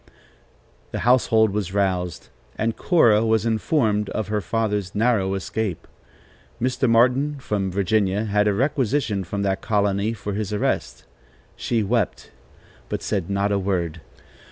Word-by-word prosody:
The - - -4
household 115 -3 +4
was 100 -2 -3
roused, 90 -3 -1 0.3
and 115 +1 -1
Cora 115 - +4
was 110 -1 +2
informed 110 -2 +1
of 110 -2 -3
her 105 -1 0
father's 105 -4 -2
narrow 105 -4 +1
escape. 100 -2 -3 0.7
Mr. 130 +1 0
Martin 125 +5 +3
from 105 -6 -2
Virginia 100 +2 +1
had 105 0 +2
a 105 - +3
requisition 130 -4 0
from 100 +3 -3
that 95 -1 -1
colony 100 0 0
for 105 -2 -5
his 105 0 -3
arrest. 65 -11 -2 0.5
She 115 -2 -1
wept, 110 -1 -1 0.6
but - - -3
said 95 -4 -2
not 100 +1 0
a 100 - +1
word. 85 -4 -2
105 Hz, 135 wpm, -23 LUFS, 100-115 Hz, 0.7 s, household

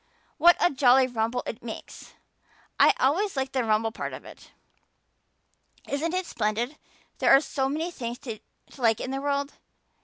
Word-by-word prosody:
What 345 +3 +7
a 350 - +3
jolly 260 -1 +5
rumble 240 0 -2
it 230 - -6
makes! 230 -2 -9 0.6
I - - +6
always 335 +6 +1
like 265 0 -1
the 260 -2 0
rumble 220 0 +1
part - - -5
of - - -9
it. - - -14 1.4
Isn't 320 +5 -2
it 370 0 -1
splendid 235 +3 -2 0.4
there - - +3
are - - +7
so 270 -2 -2
many 320 +5 -2
things 240 -6 -5
to 225 -4 -5 0.4
like 225 -2 +2
in 260 - -4
this 270 0 -3
world? 280 0 -1
265 Hz, 160 wpm, -26 LUFS, 235-290 Hz, 1.4 s, What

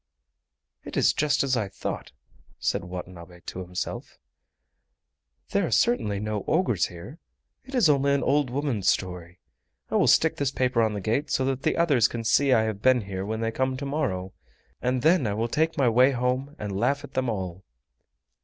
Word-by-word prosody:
"It - - -7
is - - +4
just 145 -1 +1
as 135 -2 +1
I 110 -4 -1
thought," - - -5 0.5
said - - -1
Watanabe 90 -1 -9
to 90 - -7
himself; 90 0 -5 1.3
"there 200 - +2
are - - -4
certainly 105 - +1
no 105 -1 -3
ogres 160 - +2
here; 100 - -11 0.5
it 265 +1 -8
is 240 -9 +5
only 140 -1 +3
an 140 - 0
old 145 -1 +2
woman's 130 -7 0
story. 90 -2 -2 0.5
I - - +2
will - - +3
stick 160 - +4
this 140 -2 0
paper 125 -3 +1
on 110 -2 +1
the 100 - -4
gate 115 +10 -1
so 130 - +1
that 135 0 -1
the - - 0
others 140 -9 +4
can 115 -1 -5
see 135 +5 +3
I 115 -3 +4
have 110 -2 -3
been 130 0 +4
here 95 -2 -5
when 110 +2 -3
they 115 0 0
come 130 +2 -1
to 140 - -5
morrow, 115 -11 -2 0.5
and 125 0 0
then 160 -6 +4
I 100 - -1
will 115 +2 -1
take 160 +6 0
my 135 - +3
way 125 +3 +5
home 130 +3 -1
and 105 -5 -5
laugh 140 +6 +1
at 145 - -11
them 130 -1 0
all." 95 -3 -4
125 Hz, 190 wpm, -26 LUFS, 100-140 Hz, 1.3 s, is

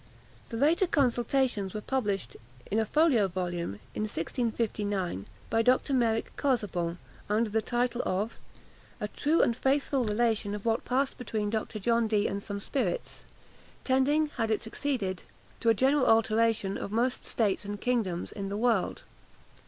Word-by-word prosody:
The 230 - -4
later 320 +8 +3
consultations 245 - +1
were 210 - -3
published 205 - -1 0.4
in 215 - +2
a 220 - 0
folio 280 -8 +4
volume, 175 - -3 0.2
in - - -3
1659, 205 - -2 0.2
by 225 - +3
Dr. 255 +3 +2
Meric 230 -3 +1
Casaubon, 190 - 0 0.3
under 215 +1 +1
the 220 +1 +2
title 240 +2 0
of 205 +5 -1 0.7
_A 210 - -2
true 310 +3 +3
and 235 - +2
faithful 270 +1 +1
Relation 215 -2 +1
of 210 - -8
what 225 -1 +1
passed 265 +3 0
between 215 -4 -2
Dr. 220 0 -2
John 230 +2 +2
Dee 210 -1 +2
and 200 +1 -1
some 200 0 -5
Spirits; 200 -4 -3 0.6
tending, 285 +4 +2
had 225 -2 0
it 220 - 0
succeeded, 225 -6 -2 0.4
to 230 - +2
a 225 - +5
general 265 +4 +3
Alteration 225 -2 +3
of 200 - -5
most 245 +3 0
States 210 -4 0
and 205 0 -5
Kingdoms 215 -8 -1
in 195 -1 -5
the 200 - -3
World_. 225 -4 +1
225 Hz, 150 wpm, -29 LUFS, 205-250 Hz, 0.7 s, a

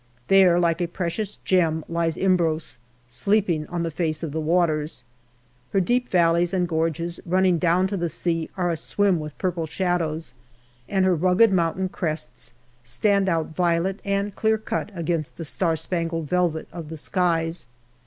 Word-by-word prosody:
There, 185 -3 +6
like 170 0 +1
a 175 - +1
precious 185 +4 -3
gem, 160 -4 +2
lies 165 -1 -1
Imbros, 165 -7 0 0.3
sleeping 155 - 0
on 175 -1 -3
the 165 - -2
face 155 0 -2
of 160 - -3
the 160 - -2
waters; 155 -4 0 0.7
her 195 - +4
deep 245 +7 +1
valleys 170 +1 +3
and 180 -1 +1
gorges, 165 +1 -1
running 185 -1 +2
down 175 +2 +3
to 195 +1 -2
the 170 -1 -1
sea, 165 0 -2
are 175 -2 +1
aswim 185 +2 +1
with 150 -1 -7
purple 175 -3 -2
shadows, 165 -4 -1 0.6
and 190 -1 +2
her 185 - +4
rugged 185 +6 +4
mountain 180 +1 +1
crests 125 -9 -4 0.3
stand 195 - +1
out 160 -2 -1
violet 180 +2 +1
and 200 0 -1
clear 220 0 +2
cut 220 0 -3
against 165 -3 -2
the 165 - -5
star 165 +2 0
spangled 165 -1 -2
velvet 175 -2 0
of 165 -3 -7
the 160 - -6
skies. 165 -3 0
170 Hz, 160 wpm, -24 LUFS, 160-185 Hz, 0.7 s, There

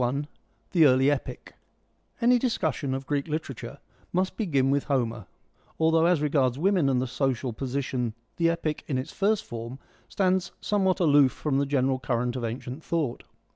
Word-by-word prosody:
I. 140 +4 -1 0.2
— - - -41
The 165 -5 +6
Early 130 +2 +4
Epic 145 - -4 0.7
Any 245 +1 +4
discussion 160 - -1
of 135 0 -5
Greek 145 +1 -1
literature 140 -4 -5 0.3
must 185 +1 0
begin 140 - +1
with 140 0 +1
Homer, 120 -6 -1 0.5
although 160 +1 +4
as 175 -4 +2
regards 135 -4 +2
women 180 -3 +2
and 130 -2 +2
the 130 - 0
social 130 -1 -1
position 130 -2 -2 0.2
the 165 0 +3
Epic 165 -3 -2
in 135 - -1
its 130 +4 -4
first 205 +1 +1
form 115 +2 -7 0.3
stands 185 -2 0
somewhat 190 -2 +1
aloof 145 -5 +5
from 140 -3 -1
the 140 - 0
general 135 -1 +1
current 125 -1 -1
of 125 - -4
ancient 125 +5 -5
thought. 155 -8 -2
140 Hz, 170 wpm, -27 LUFS, 130-165 Hz, 0.7 s, The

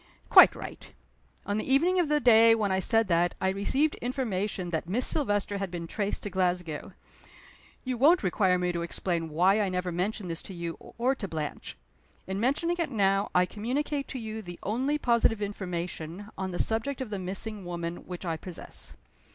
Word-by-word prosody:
"Quite - - +9
right! - - -9 0.5
On 205 +1 -1
the 215 - -3
evening 350 +7 +4
of 335 -4 +1
the 300 0 +3
day 230 -3 +7
when 210 -3 0
I 190 - +2
said 225 +3 +2
that 175 +1 +2
I 190 - +1
received 265 +11 +1
information 210 -8 -2
that 165 +1 -3
Miss 245 +7 +4
Silvester 205 -7 +1
had 195 -1 -3
been 170 -1 -5
traced 200 +4 -3
to 205 - -5
Glasgow. 180 -3 -1 0.9
You 255 -2 -3
won't 315 +4 +5
require 185 0 +2
me 180 0 0
to 170 -1 -3
explain 170 -1 -2
why 185 +7 +3
I 200 - 0
never 180 0 -2
mentioned 185 +1 -2
this 165 - -3
to 190 - -9
you 170 -1 -4 0.2
or 250 +3 +2
to 230 -7 -5
Blanche. 155 - -5 0.5
In 190 +1 -3
mentioning 305 +9 +1
it 335 - 0
now, 200 -4 +1
I 180 0 +5
communicate 275 +9 -2
to - - -5
you 220 -2 -5
the 175 -3 -9
only 260 +8 0
positive 235 -5 +2
information, 180 -1 -5
on 190 0 -3
the 175 - -4
subject 225 +8 -1
of 255 -5 -5
the 200 - -3
missing 195 +3 -3
woman, 170 -1 -4
which 180 0 -6
I 165 -2 -1
possess. 175 +1 -6
200 Hz, 190 wpm, -28 LUFS, 180-235 Hz, 0.9 s, Quite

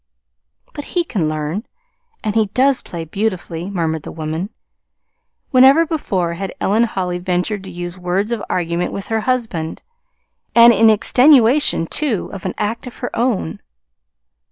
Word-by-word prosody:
"But 290 - -7
he 350 - +3
can 195 - -1
learn 155 +6 -3 0.6
and 210 - -1
he 220 -1 +2
does 260 +6 +2
play 165 -2 -7
beautifully," 180 -2 -3
murmured 165 -5 -2
the - - -8
woman; 160 +4 -4 1.0
whenever 270 +5 +6
before 195 - -2
had 190 +3 -5
Ellen 220 +4 +2
Holly 180 -5 -3
ventured 180 +3 -2
to - - -8
use 175 0 -6
words 185 +5 -1
of 235 -3 -2
argument 170 0 -1
with 195 - -6
her 225 0 +1
husband, 220 -10 -2 0.7
and 235 0 +8
in 225 +1 +5
extenuation, 250 - +4
too, 240 - -1
of 195 - -8
an 185 - -3
act 220 +4 -3
of 245 - -10
her - - -5
own! 230 - -1
200 Hz, 150 wpm, -18 LUFS, 175-235 Hz, 1.0 s, and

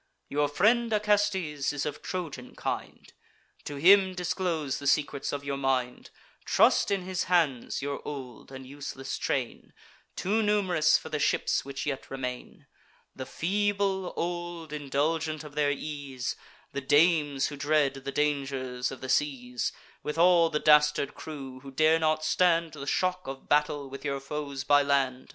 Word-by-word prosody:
Your 145 +1 +1
friend 225 +10 +2
Acestes 205 -9 +1
is 145 -1 -3
of 150 -1 -4
Trojan 155 -9 -6
kind; - - -5 0.5
To 145 - -5
him 190 +5 +5
disclose 175 -5 -2
the 140 - -4
secrets 145 -1 +1
of 145 0 -4
your 140 -1 -3
mind: 130 -2 -1 0.3
Trust - - +4
in 195 -2 0
his 185 -1 -2
hands 155 -8 +1
your 140 0 -3
old 135 -4 -8
and 130 0 -9
useless 135 0 -6
train; - - -3 0.4
Too 210 +4 0
num'rous 190 -7 +3
for 160 - -9
the 155 -1 -2
ships - - +1
which 140 0 -5
yet 135 -2 -4
remain: 125 -2 -6 0.5
The 130 -1 -6
feeble, 195 0 0
old, 175 -2 -4
indulgent 155 +2 -1
of 150 -1 -11
their 145 -1 +2
ease, 140 -3 -4 0.4
The 140 - -4
dames 145 -1 +3
who 145 - -7
dread 145 -1 +2
the 135 0 -6
dangers 135 -4 -1
of 135 - -9
the 130 - -5
seas, 125 -4 0 0.3
With 150 +1 -4
all 170 -1 +5
the 150 - 0
dastard 150 -2 +4
crew, 135 -4 -8
who 135 +1 -11
dare 155 +4 +3
not 155 -1 +1
stand 165 -1 +2
The 140 -2 -8
shock 185 +3 0
of 135 0 -7
battle 150 -1 +1
with 135 +1 -9
your 140 -2 -2
foes 140 -1 -5
by 145 0 +5
land. 135 -2 0
150 Hz, 155 wpm, -28 LUFS, 135-170 Hz, 0.5 s, him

